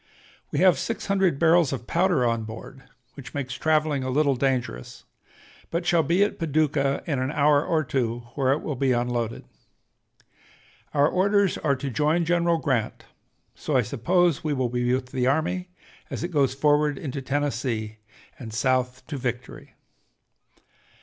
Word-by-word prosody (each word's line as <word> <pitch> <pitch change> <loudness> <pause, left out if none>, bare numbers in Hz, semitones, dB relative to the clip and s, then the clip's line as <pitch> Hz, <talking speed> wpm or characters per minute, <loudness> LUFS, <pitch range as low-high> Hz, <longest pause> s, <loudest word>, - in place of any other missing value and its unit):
We - - -2
have 185 -2 +5
six 230 - -3
hundred 195 -6 +1
barrels 165 -1 +4
of 130 -3 -4
powder 170 -6 +2
on 115 -1 0
board, 115 +4 -10 0.3
which 140 +2 -11
makes 130 -3 -3
traveling 155 -3 +1
a 130 - -3
little 140 +1 +2
dangerous, 125 - -2 0.7
but 170 +1 -2
shall 175 -1 +3
be 170 +6 +2
at 205 - -2
Paducah 150 -3 0
in 145 -5 -1
an 130 +1 -1
hour 145 0 +3
or 160 -2 0
two, 120 -3 -2
where 135 -2 +1
it 145 - 0
will 150 - -2
be 130 0 +1
unloaded. 120 -1 -2 1.5
Our 145 0 +5
orders 200 +2 +2
are 140 -3 +1
to 135 +1 -5
'join 155 +7 +1
General 170 0 +2
Grant,' 130 -8 -2 0.5
so 145 - -1
I 125 - +3
suppose 165 - +1
we 155 -2 0
will 130 -3 -1
be 125 0 0
with 130 0 -1
the 125 -2 0
army 165 +6 0 0.4
as - - -5
it 175 - -2
goes 140 -6 +1
forward 150 0 +2
into 140 -1 -5
Tennessee 130 -6 -2 0.4
and 115 -3 -8
South 130 +2 0
to 145 - -5
victory. 125 0 -5
140 Hz, 160 wpm, -25 LUFS, 125-160 Hz, 1.5 s, have